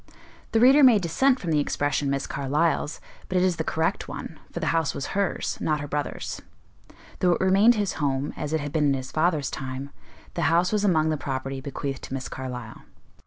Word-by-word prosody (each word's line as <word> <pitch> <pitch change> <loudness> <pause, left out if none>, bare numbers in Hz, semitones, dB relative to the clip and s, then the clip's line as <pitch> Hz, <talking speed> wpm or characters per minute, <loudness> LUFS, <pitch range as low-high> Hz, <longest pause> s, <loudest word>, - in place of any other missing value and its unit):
The 225 - +3
reader 265 +5 +7
may 250 -5 +8
dissent 255 +9 +2
from 170 - -3
the 150 - +3
expression 145 0 0
"Miss 140 0 -1
Carlyle's," 145 +3 0 0.3
but 185 - 0
it 180 - +3
is 185 -2 +1
the 160 - -1
correct 160 +4 -1
one, 160 - -7
for - - -4
the 165 - -2
house 165 -3 0
was 135 - -3
hers, 200 -1 -1
not 155 -1 +1
her 145 - -5
brother's; 145 0 -4 0.8
though 180 -1 +4
it - - -2
remained 195 +5 +5
his 205 -3 -1
home, 140 0 0
as 150 - -4
it 160 -1 0
had 145 0 -4
been 155 -1 +1
in 140 - +3
his 130 -1 -6
father's 155 -4 +1
time, 135 0 -5 0.4
the - - -3
house 170 +2 +3
was 210 -1 +1
among 160 -6 +3
the 155 - 0
property 135 -1 -4
bequeathed 140 0 -4
to 130 - -5
Miss 130 - -5
Carlyle. 125 -4 -7
155 Hz, 210 wpm, -25 LUFS, 140-180 Hz, 0.8 s, may